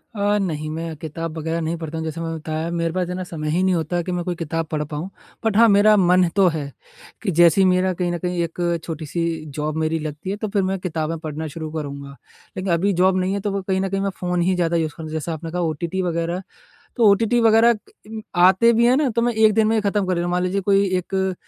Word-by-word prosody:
अ, 205 0 +1
नहीं 155 -5 -3
मैं 165 0 -4
किताब 165 +1 -6
वगैरह 165 +1 -2
नहीं 160 +1 -2
पढ़ता 160 -1 -6
हूँ 160 - -3
जैसे 160 +1 -4
मैंने 165 0 -3
बताया 155 +1 -4
मेरे 170 -1 -1
पास 180 -1 -1
है 180 - -3
ना, 185 - -4
समय 155 -4 -5
ही 170 +4 +1
नहीं 190 0 +3
होता 175 +1 -1
कि 180 - -4
मैं 175 -1 -2
कोई 180 - -2
किताब 165 0 -3
पढ़ 150 -1 -1
पाऊँ। 150 +4 -5 0.4
बट 215 -2 +2
हाँ, 230 +1 +7
मेरा 205 +1 +6
मन 180 -1 +4
तो 195 -2 +5
है 145 -2 -4 0.5
कि 200 - -1
जैसे 170 +2 +6
ही - - +5
मेरा 185 0 +2
कहीं 175 0 -2
न 175 - -2
कहीं 180 0 -2
एक 170 +1 -2
छोटी-सी 165 +1 -3 0.3
जॉब 150 0 -2
मेरी 160 0 0
लगती 150 +3 -6
है, 200 - -1
तो 215 - -3
फिर 200 -1 0
मैं 190 +1 -1
किताबें 165 -2 -3
पढ़ना 155 0 -5
शुरू 155 +1 -6
करूँगा। 140 -3 -6 0.4
लेकिन 185 0 -2
अभी 195 +4 +1
जॉब 185 +1 +3
नहीं 185 +1 0
है 200 - -1
तो 205 +1 -2
वो 195 0 -2
कहीं 190 0 -1
न 195 - -1
कहीं 195 +1 -1
मैं 195 - 0
फ़ोन 180 -1 -1
ही 185 +2 +2
ज़्यादा 170 -1 +1
यूज़ 160 -2 -1
कर 160 -1 -7
जैसा 160 +1 -3
आपने 160 +1 -6
कहा 180 +1 -2
ओटीटी 170 +3 -2
वगैरह, 170 0 -2 0.6
तो 235 -3 +4
ओटीटी 230 +4 +3
वगैरह 225 +1 +5 0.3
म 220 0 -6 0.3
आते 230 +5 +4
भी 235 +1 +3
हैं 250 +2 +4
ना 295 -1 +2
तो 235 - +3
मैं 240 0 +2
एक 220 -1 +4
दिन 220 -1 +3
में 220 - +2
ही - - +2
ख़त्म 200 -1 0
कर 185 - +1
लेता 170 0 -1
हूँ। 175 - -2
मान 180 0 +1
लीजिए 185 +2 0
कोई 195 +1 +3
एक 190 +1 -2
175 Hz, 265 wpm, -21 LUFS, 160-195 Hz, 0.6 s, हाँ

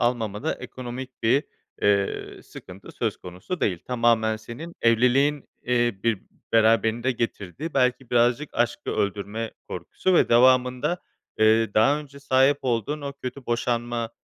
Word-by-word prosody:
almamada 120 +2 -1
ekonomik 130 0 -8
bir, 130 +6 +3 0.4
eee, 100 -1 0
sıkıntı 95 +2 -12
söz - - -2
konusu 90 - -7
değil. 90 -4 0
Tamamen 115 -3 +2
senin 130 +10 -9
evliliğin, 125 +5 +3 0.2
eee, 120 -4 +1
bir 115 -3 0 0.3
beraberinde 115 +2 +3
getirdiği, 115 - -4
belki 125 -1 +1
birazcık 120 +4 +2
aşkı 120 0 -1
öldürme 105 +3 -2 0.2
korkusu 185 -1 -1
ve - - +4
devamında, 125 +6 +3 0.4
eee, 110 0 +4
daha 135 +7 +4
önce 140 -1 -13
sahip 135 +1 +3
olduğun 125 +4 -1
o 140 -1 -5
kötü 130 -1 -8
boşanma, 120 -1 -1
120 Hz, 125 wpm, -25 LUFS, 110-130 Hz, 0.4 s, ve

